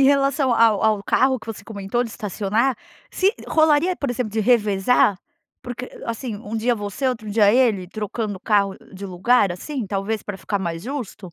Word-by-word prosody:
em -, -, +6 dB
relação 275 Hz, -1 st, +3 dB
ao 225 Hz, -3 st, +4 dB
ao 215 Hz, -2 st, +2 dB
carro 260 Hz, +5 st, +2 dB
que 220 Hz, -, -15 dB
você 215 Hz, -2 st, -7 dB
comentou 205 Hz, +3 st, -2 dB
de 230 Hz, -, -7 dB
estacionar, 215 Hz, +4 st, -1 dB, 0.3 s
se 390 Hz, +3 st, +2 dB, 0.2 s
rolaria, 315 Hz, +3 st, +3 dB
por 280 Hz, -4 st, -2 dB
exemplo, 240 Hz, -3 st, -2 dB
de 220 Hz, -, -3 dB
revezar, 210 Hz, -2 st, +3 dB, 0.4 s
porque, 250 Hz, 0 st, -6 dB, 0.2 s
assim, 230 Hz, -1 st, -4 dB
um 210 Hz, +1 st, -8 dB
dia 240 Hz, +2 st, +1 dB
você, 205 Hz, +5 st, -2 dB
outro 225 Hz, -4 st, -4 dB
dia 205 Hz, -1 st, +5 dB
ele 225 Hz, -7 st, +3 dB
trocando 210 Hz, 0 st, -4 dB
o -, -, -14 dB
carro 200 Hz, -2 st, +1 dB, 0.2 s
de 195 Hz, +1 st, -7 dB
lugar 195 Hz, +3 st, +2 dB
assim, 235 Hz, +6 st, -4 dB
talvez 205 Hz, +2 st, -2 dB
para 205 Hz, -2 st, -6 dB
ficar 200 Hz, +1 st, -2 dB
mais 170 Hz, -2 st, -4 dB
justo? 230 Hz, -, -6 dB
220 Hz, 185 wpm, -22 LUFS, 200-250 Hz, 0.4 s, em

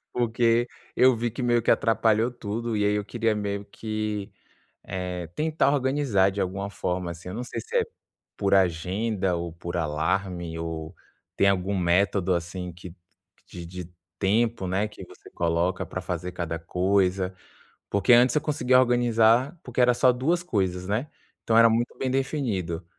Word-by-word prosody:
Porque 120 Hz, 0 st, +2 dB, 0.3 s
eu 130 Hz, 0 st, +6 dB
vi 120 Hz, +1 st, -1 dB
que 120 Hz, +4 st, -6 dB
meio 120 Hz, -1 st, +2 dB
que -, -, +2 dB
atrapalhou 115 Hz, 0 st, +3 dB
tudo 115 Hz, -1 st, -4 dB
e 105 Hz, -, +1 dB
aí 105 Hz, 0 st, +2 dB
eu 105 Hz, 0 st, -1 dB
queria 115 Hz, +1 st, 0 dB
meio 100 Hz, -1 st, -3 dB
que, 110 Hz, -1 st, -4 dB, 0.5 s
eh, 90 Hz, -2 st, -4 dB
tentar 155 Hz, -, +1 dB
organizar 130 Hz, -8 st, +2 dB
de 100 Hz, +1 st, -4 dB
alguma 100 Hz, +2 st, -2 dB
forma, 90 Hz, -3 st, -3 dB
assim. 85 Hz, +2 st, -10 dB
Eu 90 Hz, -, -6 dB
não 120 Hz, +3 st, -4 dB
sei -, -, -5 dB
se 470 Hz, -, -5 dB
é -, -, +3 dB, 0.5 s
por 100 Hz, -1 st, +2 dB
agenda 95 Hz, +2 st, +1 dB
ou 85 Hz, -1 st, -4 dB
por 85 Hz, +1 st, -6 dB
alarme 85 Hz, +2 st, -1 dB
ou 80 Hz, 0 st, -5 dB, 0.4 s
tem 100 Hz, -, +4 dB
algum 100 Hz, +1 st, +1 dB
método 95 Hz, +1 st, +2 dB
assim 90 Hz, +1 st, -4 dB
que 90 Hz, 0 st, -11 dB, 0.5 s
de 85 Hz, -1 st, -9 dB
de 90 Hz, 0 st, -8 dB, 0.3 s
tempo, 110 Hz, +1 st, +1 dB
né, 95 Hz, +4 st, 0 dB
que 105 Hz, -, -11 dB
você -, -, -16 dB
coloca 85 Hz, +2 st, 0 dB
pra 95 Hz, -, -5 dB
fazer 90 Hz, 0 st, -4 dB
cada 85 Hz, -2 st, -3 dB
coisa. 95 Hz, +2 st, 0 dB, 0.5 s
Porque 100 Hz, +5 st, +3 dB
antes, 125 Hz, +2 st, +6 dB
eu -, -, +4 dB
conseguia 140 Hz, -4 st, +2 dB
organizar 120 Hz, +3 st, +3 dB
porque 125 Hz, 0 st, -3 dB
era 125 Hz, 0 st, +5 dB
só 125 Hz, +1 st, +4 dB
duas 160 Hz, +8 st, 0 dB
coisas 95 Hz, -, -1 dB
né. 115 Hz, +8 st, -1 dB, 0.3 s
Então, 115 Hz, -, +1 dB
era 115 Hz, 0 st, +8 dB
muito 115 Hz, +2 st, 0 dB
bem 130 Hz, -, -1 dB
definido. 120 Hz, -, -2 dB
100 Hz, 165 wpm, -26 LUFS, 90-120 Hz, 0.5 s, era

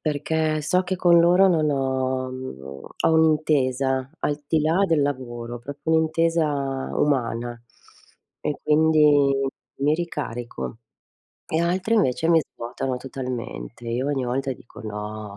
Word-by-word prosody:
perché 155 Hz, +1 st, 0 dB
so 180 Hz, +5 st, +2 dB
che 185 Hz, +1 st, -2 dB
con 170 Hz, -2 st, +5 dB
loro 180 Hz, +3 st, +5 dB
non 155 Hz, -4 st, +2 dB
ho 130 Hz, -1 st, -1 dB
mhmm, 130 Hz, -, -7 dB, 0.4 s
ho 160 Hz, -, +4 dB
un'intesa 140 Hz, -4 st, +2 dB
al 145 Hz, 0 st, -2 dB
di 160 Hz, 0 st, +2 dB
là 165 Hz, +6 st, +2 dB
del 160 Hz, -4 st, +2 dB
lavoro, 120 Hz, -4 st, -4 dB
proprio 145 Hz, +5 st, -3 dB
un'intesa 160 Hz, -4 st, +1 dB
umana 120 Hz, -4 st, 0 dB, 0.8 s
e 150 Hz, -, -2 dB
quindi 150 Hz, -2 st, +4 dB, 0.5 s
mi 145 Hz, +2 st, +2 dB
ricarico 120 Hz, -, -5 dB, 0.7 s
e 160 Hz, +1 st, 0 dB
altri 185 Hz, +6 st, +1 dB
invece 160 Hz, -, +2 dB
mi 165 Hz, -1 st, +6 dB
svuotano 125 Hz, 0 st, -5 dB
totalmente. 120 Hz, -, -6 dB
Io 125 Hz, +4 st, -1 dB
ogni 135 Hz, -3 st, 0 dB
volta 135 Hz, +2 st, -1 dB
dico: 120 Hz, -, -13 dB
"No". 105 Hz, -1 st, -6 dB
140 Hz, 130 wpm, -24 LUFS, 125-160 Hz, 0.8 s, mi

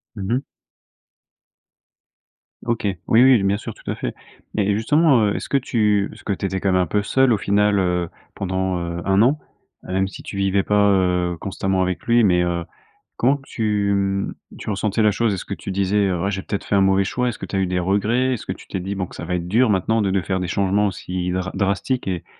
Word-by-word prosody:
Mmh 100 Hz, +2 st, -2 dB
mh. 135 Hz, +2 st, 0 dB, 2.2 s
OK. 115 Hz, -3 st, -1 dB, 0.2 s
Oui, 115 Hz, +3 st, +6 dB
oui, 130 Hz, -6 st, +6 dB
bien 100 Hz, +1 st, +2 dB
sûr, -, -, -7 dB
tout -, -, -11 dB
à -, -, -3 dB
fait. -, -, -4 dB, 0.4 s
Mais 105 Hz, -1 st, +1 dB
justement, 135 Hz, +1 st, +3 dB
heu, 100 Hz, -, 0 dB
est-ce -, -, -5 dB
que 140 Hz, -, +3 dB
tu 105 Hz, -6 st, +1 dB
parce -, -, -14 dB
que 100 Hz, -, -1 dB
tu 95 Hz, -, -4 dB
étais 95 Hz, 0 st, -1 dB
quand 95 Hz, 0 st, +1 dB
même 90 Hz, 0 st, +3 dB
un -, -, +1 dB
peu 105 Hz, +4 st, 0 dB
seul, 130 Hz, +4 st, +3 dB
au -, -, +2 dB
final, 100 Hz, +1 st, +2 dB
heu, 90 Hz, -2 st, 0 dB, 0.2 s
pendant 95 Hz, -1 st, -2 dB
heu, 85 Hz, 0 st, -4 dB
un 95 Hz, +1 st, +3 dB
an? 135 Hz, +6 st, +4 dB, 0.5 s
Même 95 Hz, +1 st, -1 dB
si -, -, -10 dB
tu -, -, -8 dB
vivais 95 Hz, 0 st, +1 dB
pas, 105 Hz, 0 st, +3 dB
heu, 90 Hz, -3 st, +1 dB
constamment 95 Hz, 0 st, -1 dB
avec 90 Hz, -1 st, -2 dB
lui, 120 Hz, 0 st, +4 dB
mais 90 Hz, -3 st, +4 dB
heu, 85 Hz, -1 st, -1 dB, 0.5 s
comment 135 Hz, +4 st, +2 dB
tu 105 Hz, -3 st, 0 dB
mmh, 100 Hz, 0 st, -1 dB, 0.2 s
tu -, -, -8 dB
ressentais 105 Hz, +1 st, -1 dB
la 105 Hz, -, +5 dB
chose? 110 Hz, +1 st, +1 dB
Est-ce 95 Hz, -, -5 dB
que -, -, -3 dB
tu -, -, -7 dB
disais: 100 Hz, 0 st, +1 dB
«Ouais, 95 Hz, +3 st, -1 dB
j'ai 95 Hz, -1 st, -3 dB
peut-être 100 Hz, -, -4 dB
fait -, -, -2 dB
un 100 Hz, -, +4 dB
mauvais 95 Hz, 0 st, +3 dB
choix»? 125 Hz, +5 st, -1 dB
Est-ce 115 Hz, -, -4 dB
que 95 Hz, -, -6 dB
tu 95 Hz, -, -4 dB
as -, -, +1 dB
eu 95 Hz, -, +1 dB
des 90 Hz, 0 st, -1 dB
regrets? 110 Hz, +8 st, +1 dB
Est-ce 115 Hz, -, -6 dB
que -, -, -2 dB
tu -, -, -12 dB
t'es 95 Hz, -, -3 dB
dit, 100 Hz, +3 st, -4 dB
bon 95 Hz, -2 st, -2 dB
que -, -, -13 dB
ça -, -, -6 dB
va 90 Hz, +1 st, -1 dB
être 85 Hz, 0 st, -5 dB
dur 115 Hz, +3 st, +3 dB
maintenant 105 Hz, +4 st, +1 dB
de 100 Hz, -, +1 dB
de 95 Hz, 0 st, +1 dB
faire 95 Hz, +1 st, -2 dB
des 90 Hz, -, -3 dB
changements 100 Hz, +2 st, +1 dB
aussi 90 Hz, -1 st, -4 dB
dra 95 Hz, +1 st, -2 dB
drastiques 100 Hz, +6 st, -1 dB
et 90 Hz, -3 st, -3 dB
100 Hz, 240 wpm, -21 LUFS, 95-105 Hz, 2.2 s, Oui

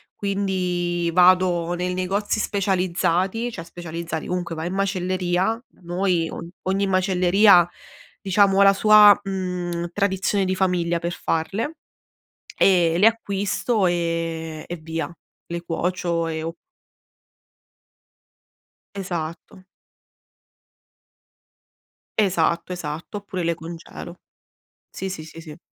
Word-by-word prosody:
quindi 180 Hz, -4 st, -1 dB
vado 180 Hz, -1 st, +4 dB
nei 180 Hz, +1 st, -2 dB
negozi 200 Hz, +4 st, -1 dB
specializzati, 190 Hz, +2 st, 0 dB
cioè 165 Hz, -6 st, -8 dB
specializzati, 170 Hz, -1 st, -6 dB
comunque 175 Hz, -2 st, -3 dB
vai 160 Hz, +1 st, -4 dB
in 185 Hz, -, -4 dB
macelleria, 185 Hz, +2 st, 0 dB, 0.2 s
noi 175 Hz, -1 st, 0 dB
o 170 Hz, -, -7 dB, 0.2 s
ogni 195 Hz, +1 st, +1 dB
macelleria 185 Hz, 0 st, +4 dB, 0.5 s
diciamo 195 Hz, 0 st, +3 dB
ha -, -, +7 dB
la 195 Hz, 0 st, +7 dB
sua, 210 Hz, 0 st, +7 dB
mhmm, 180 Hz, -3 st, -3 dB
tradizione 195 Hz, 0 st, 0 dB
di 185 Hz, -, 0 dB
famiglia 175 Hz, -3 st, +1 dB
per 170 Hz, +1 st, -3 dB
farle 210 Hz, -, -2 dB, 0.8 s
e 170 Hz, -3 st, +4 dB
le 205 Hz, +5 st, +5 dB
acquisto 205 Hz, -1 st, -1 dB
e 165 Hz, -2 st, -2 dB
e 175 Hz, -, -4 dB
via, 165 Hz, +1 st, -5 dB, 0.3 s
le 170 Hz, 0 st, -5 dB
cuocio 170 Hz, 0 st, -1 dB
e 160 Hz, -1 st, -3 dB
o 165 Hz, +1 st, -4 dB, 2.4 s
Esatto. 175 Hz, -1 st, -6 dB, 2.6 s
Esatto, 175 Hz, -2 st, +1 dB
esatto. 165 Hz, +3 st, -6 dB
Oppure 185 Hz, -3 st, -5 dB
le 170 Hz, -, +1 dB
congelo. 170 Hz, +1 st, -9 dB, 0.7 s
Sì, 190 Hz, -, -5 dB
sì, 160 Hz, -4 st, -6 dB
sì, 160 Hz, +1 st, -11 dB
sì. 160 Hz, -1 st, -11 dB
180 Hz, 105 wpm, -23 LUFS, 170-195 Hz, 2.6 s, ha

